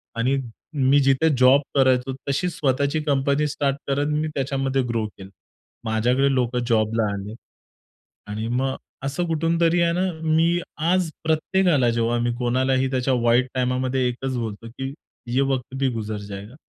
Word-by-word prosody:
आणि 125 +4 +1 0.5
मी 145 +1 +6
जिथे 135 +4 +3
जॉब 130 +3 +6
करायचो 130 -1 +3 0.2
तशी 180 +6 0
स्वतःची 140 -1 0
कंपनी 140 +1 +1
स्टार्ट 140 -1 -1
करत 140 +1 0
मी 155 - -1
त्याच्यामध्ये 135 -1 0
ग्रो 115 -2 -1
केलं. 95 -2 -13 0.6
माझ्याकडे 125 +5 +2
लोकं 125 -1 0
जॉबला 115 -1 +2
आले. 100 +2 -6 0.9
आणि 110 +2 -4
मग 130 +2 -1 0.3
असं 140 +6 -1
कुठूनतरी 165 +1 +2
आहे 170 - +3
ना, 180 - 0 0.2
मी 165 +2 +2 0.3
आज 185 -3 +2
प्रत्येकाला 160 -3 +2
जेव्हा 115 0 +1
मी 120 0 0
कोणालाही 130 +2 +1
त्याच्या 130 0 +1
वाईट 120 +2 +3
टाईमामध्ये 130 0 0
एकच 130 +1 -3
बोलतो 115 -1 -5
की 135 +3 -6 0.3
"ये 125 +3 +1
वक्त 130 0 -3
भी 135 0 +1
गुजर 110 -1 -4
जाएगा." 100 +5 -8
130 Hz, 145 wpm, -23 LUFS, 120-145 Hz, 0.9 s, मी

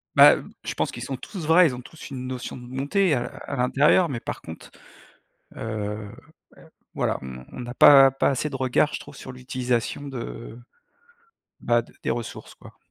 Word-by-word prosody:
Ben, - - +7
je - - -4
pense - - -1
qu'ils - - -6
sont 135 -2 -4
tous 180 -1 -7
vrais, 165 +2 +6
ils 125 - -3
ont 125 - -8
tous 155 +5 -12
une 130 -1 -6
notion 125 -1 -5
de 125 -1 -10
bonté, 145 +8 +1
heu, 120 - -3 0.2
à 140 - -4
l'intérieur, 145 +8 +4
mais 125 -6 -4
par - - -6
contre, 80 0 -11 0.9
heu, 105 -1 -4 0.8
voilà, - - 0
on 65 -1 -9
on 125 - -7
a 120 - -5
pas 135 -1 +8
pas 135 - +1
assez 140 +2 -1
de 135 - -4
regards, 130 +3 +1
je - - -3
trouve, 140 - -12
sur 130 - -9
l'utilisation 125 +1 -2
de, 115 - -7 1.0
ben, 120 0 +2
de - - -18
des - - 0
ressources 120 -2 -6
quoi. - - -16
130 Hz, 185 wpm, -24 LUFS, 120-140 Hz, 1.0 s, pas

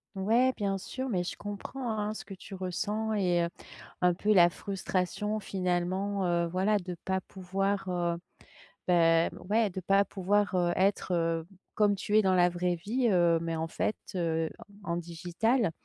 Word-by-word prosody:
Ouais, 230 +7 +3
bien 200 -2 -1
sûr 260 +7 -5
mais 180 -5 0
je - - -4
comprends, 205 +5 -5
hein, 210 0 -1
ce - - -7
que 195 - -9
tu 195 - -12
ressens 205 +4 -2
et 180 -4 +2
heu, 170 - -3 0.5
un 180 -1 +4
peu 210 +4 +2
la 175 -3 +7
frustration 195 +3 -2
finalement, 190 +1 -1
heu, 170 -1 +1
voilà, 195 +4 +1
de 180 -1 -6
pas 190 0 0
pouvoir, 195 +1 -2
heu, 175 -1 0 0.7
ben, 165 -1 +4
m - - -11
ouais, 220 -1 +3
de 185 +1 -5
pas 195 +2 +3
pouvoir, 200 +2 +1
heu, 175 -1 +2
être, 195 0 +1
heu, 165 -1 0 0.3
comme 205 -1 +3
tu 205 +2 -2
es - - +5
dans 190 -2 +3
la 180 0 +5
vraie 175 0 0
vie, 235 +9 0
heu, 175 -3 +4
mais 165 0 -2
en 160 0 -2
fait, 210 - -1 0.2
heu, 165 -3 0 0.4
en 175 - -3
en 170 - 0
digital. 175 +6 0
185 Hz, 180 wpm, -30 LUFS, 175-205 Hz, 0.7 s, la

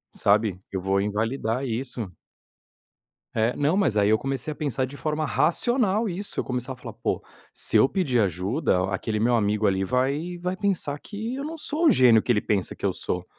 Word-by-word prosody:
Sabe, 105 -2 +2
eu 95 - -2
vou 95 +1 +1
invalidar 115 +4 -1
isso. 120 -5 -4 1.2
É. 115 +2 +1
Não, 145 +4 +1
mas 160 - +2
aí 100 0 +4
eu 110 - +5
comecei 135 +2 -2
a - - -6
pensar 135 -3 -1
de 135 - -10
forma 155 +1 -2
racional 220 - +1
isso, 200 +2 -3
eu - - 0
começava 125 0 -4
a - - -22
falar: - - -7
"Pô, - - -2 0.3
se - - 0
eu 135 - +5
pedir 140 -11 +1
ajuda, 95 - +1
aquele 105 +3 -2
meu 120 +2 +3
amigo 105 -1 +1
ali, 95 -1 +2
vai 140 - -1
vai 180 +1 -3
pensar 180 -8 -1
que 220 +3 -5
eu 275 - -4
não 320 +2 -5
sou 315 +2 0
o 295 - +7
gênio 120 -4 +6
que 120 - 0
ele 105 - +2
pensa 100 -4 -1
que - - -5
eu - - +1
sou". - - -3
130 Hz, 200 wpm, -25 LUFS, 105-170 Hz, 1.2 s, o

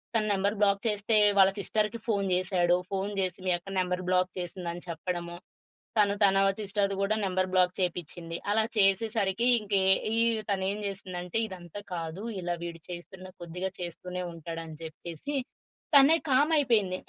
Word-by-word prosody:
తన 220 - +3
number 200 +2 0
block 200 0 +3
చేస్తే, 210 +1 +2 0.2
వాళ్ళ 190 0 +7
సిస్టర్‌కి 215 +3 -1
ఫోను 200 -3 +1
జేసాడు. 180 -1 +2 0.2
ఫోను 195 +1 -2
చేసి 185 0 -2
మీ - - +3
అక్క 175 +3 -12
నంబర్ 180 0 -1
బ్లాక్ 185 0 +2
చేసింది 175 0 -5
అని 175 - -9
చెప్పడము. 170 +1 -4 0.6
తను 200 -1 +4
తన 195 -1 +5 0.2
సిస్టర్‌ది 200 -1 0
గూడా 205 +2 +1
నంబర్ 185 0 0
బ్లాక్ 180 -1 +3
చేపించింది. 170 -1 -3 0.2
అలా 220 0 +3
చేసేసరికి 210 +2 +2
ఇంక 210 -1 -11 0.4
ఈ - - +1 0.3
తనేం 195 +1 0
జేసిందంటే 185 0 -4
ఇదంతా 180 +1 -8
కాదు 165 +3 -5 0.2
ఇలా 175 0 -2
వీడు 170 -1 -6
చేస్తున్న 185 +2 -8 0.2
కొద్దిగా 180 +3 -4
చేస్తూనే 180 +1 -5
ఉంటాడు 165 0 -6
అని 160 - -9
జెప్పేసి 165 - -6 0.6
తనే 280 +4 +8 0.2
కామ్ 290 +5 +4
అయిపోయింది. 210 -10 +2
185 Hz, 150 wpm, -29 LUFS, 175-205 Hz, 0.6 s, తనే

